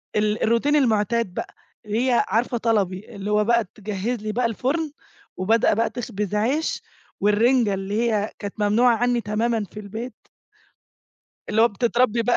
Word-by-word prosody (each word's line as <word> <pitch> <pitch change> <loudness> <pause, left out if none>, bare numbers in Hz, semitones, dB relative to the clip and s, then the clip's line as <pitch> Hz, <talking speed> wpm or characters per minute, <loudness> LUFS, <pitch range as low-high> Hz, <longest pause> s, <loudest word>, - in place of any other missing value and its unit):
ال 210 0 +1
الروتين 235 +7 +2
المعتاد 230 -5 +1
بقى، - - -6 0.3
اللي 225 +5 0
هي 245 -2 +3
عارفة 240 +2 0
طلبي، 210 -2 -1
اللي 200 +1 -4
هو 210 0 +3
بقى 235 +1 +3
تجهّز 210 +3 -3
لي 215 0 -3
بقى 240 +2 0
الفرن، 280 +7 -1 0.5
وبادئة 215 +5 +3
بقى 225 +2 +1
تخبز 210 -4 -4
عيش، 265 +10 0 0.4
والرنجة 215 +1 +3
اللي 205 +5 -1
هي 210 0 0
كانت 205 -1 -5
ممنوعة 230 +4 +4
عني 245 0 +1
تمامًا 220 +2 0
في 210 - -8
البيت. 220 +5 -6 1.4
اللي 220 +2 +3
هو 235 - +6
بتتربّي 235 +1 +1
بقى 240 +1 +2
225 Hz, 155 wpm, -23 LUFS, 210-240 Hz, 1.4 s, هو